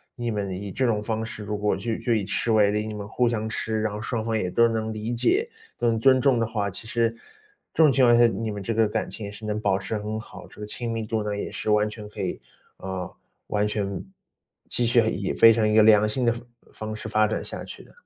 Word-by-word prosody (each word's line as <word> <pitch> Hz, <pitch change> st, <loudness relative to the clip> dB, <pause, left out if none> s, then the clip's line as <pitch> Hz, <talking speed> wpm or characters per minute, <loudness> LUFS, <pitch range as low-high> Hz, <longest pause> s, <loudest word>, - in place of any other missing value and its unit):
你 120 Hz, -1 st, -3 dB
们 100 Hz, -2 st, -2 dB
以 100 Hz, +2 st, -5 dB
这 130 Hz, +7 st, 0 dB
种 110 Hz, -3 st, +1 dB
方 110 Hz, +1 st, -2 dB
式， 110 Hz, -1 st, -7 dB
如 105 Hz, 0 st, -3 dB
果 105 Hz, -1 st, +1 dB
就 110 Hz, +3 st, -2 dB
就 120 Hz, -, 0 dB
以 110 Hz, -3 st, +1 dB
吃 115 Hz, -, -1 dB
为 105 Hz, -2 st, +4 dB
例， 105 Hz, +1 st, -1 dB
你 110 Hz, -, -5 dB
们 105 Hz, -1 st, -6 dB
互 125 Hz, +3 st, +1 dB
相 110 Hz, -2 st, -2 dB
吃， 110 Hz, 0 st, -2 dB
然 110 Hz, -, 0 dB
后 105 Hz, -, -5 dB
双 115 Hz, -1 st, -2 dB
方 115 Hz, -1 st, 0 dB
也 90 Hz, -4 st, -1 dB
都 115 Hz, +5 st, +5 dB
能 110 Hz, -1 st, -2 dB
理 110 Hz, +2 st, -3 dB
解， 390 Hz, -, +1 dB, 0.3 s
都 120 Hz, -, 0 dB
能 115 Hz, -1 st, +2 dB
尊 130 Hz, +2 st, +5 dB
重 135 Hz, -3 st, +4 dB
的 115 Hz, -, +2 dB
话， 105 Hz, -3 st, -2 dB
其 110 Hz, +4 st, -8 dB
实 115 Hz, -1 st, +1 dB, 0.6 s
这 160 Hz, -, +4 dB
种 150 Hz, -, +6 dB
情 130 Hz, -1 st, +4 dB
况 120 Hz, -, +6 dB
下， 120 Hz, -, +7 dB
你 110 Hz, 0 st, -2 dB
们 100 Hz, -1 st, -5 dB
这 115 Hz, +4 st, -1 dB
个 110 Hz, -1 st, +4 dB
感 -, -, -2 dB
情 105 Hz, -2 st, -7 dB
是 105 Hz, +1 st, -10 dB
能 105 Hz, 0 st, -1 dB
保 100 Hz, -3 st, +1 dB
持 100 Hz, +3 st, -3 dB
很 105 Hz, +1 st, -4 dB
好， -, -, -11 dB
这 -, -, -14 dB
个 -, -, -4 dB
亲 115 Hz, +2 st, -4 dB
密 110 Hz, -1 st, -3 dB
度 110 Hz, -2 st, -1 dB
呢， 105 Hz, -1 st, -2 dB
也 -, -, -4 dB
是 -, -, -4 dB
完 105 Hz, 0 st, +3 dB
全 105 Hz, 0 st, -9 dB
可 105 Hz, -, -8 dB
以 -, -, -3 dB, 0.4 s
呃， 95 Hz, -1 st, -5 dB, 0.4 s
完 105 Hz, 0 st, +1 dB
全 100 Hz, -2 st, -3 dB, 0.6 s
继 120 Hz, -, 0 dB
续 120 Hz, 0 st, +4 dB
以 100 Hz, -3 st, -2 dB
非 115 Hz, -, +8 dB
常 110 Hz, -1 st, +2 dB
一 105 Hz, -, +1 dB
个 110 Hz, -, +7 dB
良 105 Hz, -1 st, +6 dB
性 125 Hz, +4 st, -2 dB
的 115 Hz, -, +4 dB
方 115 Hz, -, -8 dB, 0.3 s
方 110 Hz, 0 st, -5 dB
式 110 Hz, 0 st, -7 dB
发 110 Hz, 0 st, +3 dB
展 110 Hz, -, -2 dB
下 -, -, -6 dB
去 -, -, -10 dB
的。 -, -, -19 dB
110 Hz, 290 characters per minute, -25 LUFS, 105-115 Hz, 0.6 s, 非